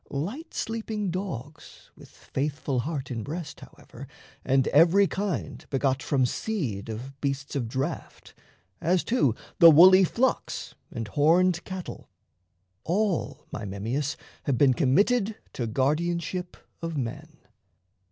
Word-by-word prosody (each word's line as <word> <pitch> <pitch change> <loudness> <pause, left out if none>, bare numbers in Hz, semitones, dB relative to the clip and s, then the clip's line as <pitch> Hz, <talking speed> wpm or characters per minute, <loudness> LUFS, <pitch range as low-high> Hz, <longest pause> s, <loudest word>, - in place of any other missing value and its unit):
Light 200 - -5
sleeping 220 -3 -3
dogs 160 - -7
with - - -15
faithful 140 -2 -3
heart 140 0 -4
in 115 -2 -3
breast, 150 +4 -6
However, - - -12 0.4
and 135 0 +2
every 170 +6 +6
kind 180 - -3
begot 135 -1 0
from 135 -3 +1
seed 125 - -3
Of 130 +5 -7
beasts 140 0 -3
of 125 -5 -1
draft, 135 +7 -5 0.5
as, 180 +2 +2
too, 225 - +2 0.2
the 170 - +10
woolly 185 +5 +8
flocks 245 +8 -1 0.2
And 115 -1 -5
horned 170 - +3
cattle, 185 -2 -7 0.7
all, 195 +1 -1
my 105 - -5
Memmius, 115 +9 -3 0.3
Have 135 -4 +1
been 135 -1 +5
committed 200 - +2 0.2
to 120 - -3
guardianship 170 +8 -1 0.2
of 165 -2 -4
men. 120 -4 -5
150 Hz, 125 wpm, -27 LUFS, 130-185 Hz, 0.7 s, the